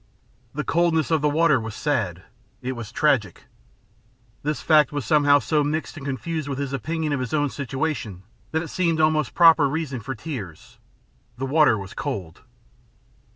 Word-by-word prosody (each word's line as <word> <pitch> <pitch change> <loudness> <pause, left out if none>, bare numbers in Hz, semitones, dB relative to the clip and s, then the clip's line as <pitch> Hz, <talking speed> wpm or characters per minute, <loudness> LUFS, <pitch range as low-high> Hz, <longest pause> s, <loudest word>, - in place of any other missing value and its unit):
The 150 - -2
coldness 165 -1 +1
of 160 -2 +2
the 150 - +2
water 150 -2 +3
was 110 -2 -6
sad; 105 - -1 0.4
it 130 - -2
was 120 -4 -7
tragic. 115 - +1 1.0
This 150 +1 -2
fact 155 -1 +4
was 145 -3 -3
somehow 145 -2 +5
so 150 +3 +1
mixed 155 +2 -2
and 150 - -9
confused 145 +3 -3
with 140 -2 -3
his 140 -1 -3
opinion 155 +3 -2
of 140 - -1
his 125 +2 -2
own 145 -2 +1
situation 135 - -3 0.3
that 160 +1 -1
it 165 - -8
seemed 170 -3 0
almost 155 -3 +2
a - - -27
proper 165 -4 +6
reason 140 -4 -3
for 130 +4 -6
tears. 105 - -8 0.6
The 135 - -3
water 145 -4 +4
was 95 -1 -8
cold. 120 - -5
145 Hz, 170 wpm, -23 LUFS, 130-155 Hz, 1.0 s, proper